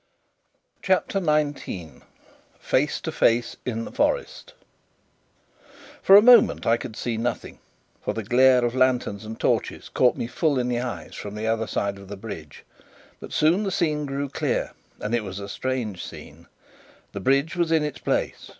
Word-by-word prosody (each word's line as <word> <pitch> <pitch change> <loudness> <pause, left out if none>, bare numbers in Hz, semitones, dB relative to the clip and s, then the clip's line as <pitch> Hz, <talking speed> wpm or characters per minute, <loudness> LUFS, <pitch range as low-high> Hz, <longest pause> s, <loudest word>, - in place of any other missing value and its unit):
CHAPTER 190 +1 +1
19 145 - -2 0.6
Face - - 0
to - - -4
Face 120 +1 +1
in 115 -2 -2
the - - -8
Forest - - -1 1.5
For 195 - +7
a 205 - +9
moment 245 -2 +6
I 115 - +4
could 115 -2 -7
see 115 -1 -3
nothing, 120 +2 -4 0.4
for 105 - -2
the 110 - -3
glare 125 +3 +4
of 120 - -1
lanterns 125 -5 +1
and 110 +1 -8
torches - - -1
caught 125 -1 +2
me - - -2
full 145 +4 0
in 125 -1 0
the 120 -1 0
eyes 125 -1 -5
from 105 0 -7
the 105 +1 -4
other 110 0 0
side 100 -1 -2
of 100 - -12
the 100 +1 -7
bridge. 90 -8 -9 0.6
But - - -10
soon 165 +6 +3
the 205 - -1
scene 155 -5 0
grew 140 +1 -3
clear: - - -2 0.3
and 105 - -4
it 120 -2 +1
was 95 -2 -7
a 100 - -6
strange 115 -2 -3
scene. - - -11 0.6
The - - -6
bridge 140 +4 +1
was 170 -2 0
in 160 -2 +3
its 150 -2 -4
place. - - -2
125 Hz, 170 wpm, -24 LUFS, 110-150 Hz, 1.5 s, a